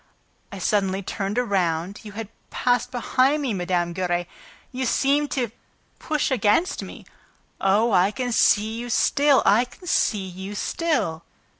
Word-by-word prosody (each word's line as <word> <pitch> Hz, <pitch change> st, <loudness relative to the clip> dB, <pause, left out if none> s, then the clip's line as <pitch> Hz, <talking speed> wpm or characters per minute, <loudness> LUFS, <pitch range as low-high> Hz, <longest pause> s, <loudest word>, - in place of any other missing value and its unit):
I 200 Hz, -, -7 dB
suddenly 195 Hz, 0 st, 0 dB
turned 195 Hz, +2 st, -3 dB
around... 190 Hz, -5 st, 0 dB
you 210 Hz, -2 st, -10 dB
had 220 Hz, -1 st, -6 dB, 0.2 s
passed 245 Hz, 0 st, 0 dB
behind 260 Hz, +3 st, +1 dB
me, 255 Hz, -5 st, -1 dB
Mme. 175 Hz, -2 st, -1 dB
Giry... 175 Hz, -1 st, -1 dB, 0.5 s
You 260 Hz, 0 st, -3 dB
seemed 285 Hz, +4 st, +2 dB
to 245 Hz, -5 st, -1 dB, 0.5 s
push 305 Hz, -2 st, -1 dB
against 255 Hz, -, +2 dB
me... -, -, -10 dB, 0.5 s
Oh, 210 Hz, +4 st, +2 dB
I 185 Hz, 0 st, +4 dB
can 245 Hz, +3 st, -3 dB
see 220 Hz, 0 st, +3 dB
you 245 Hz, 0 st, -6 dB
still, 280 Hz, +3 st, +3 dB
I 215 Hz, +4 st, +5 dB
can 305 Hz, +8 st, -16 dB
see 210 Hz, -, +1 dB
you 190 Hz, +2 st, -7 dB
still!" 210 Hz, -, -1 dB
210 Hz, 145 wpm, -23 LUFS, 190-255 Hz, 0.5 s, I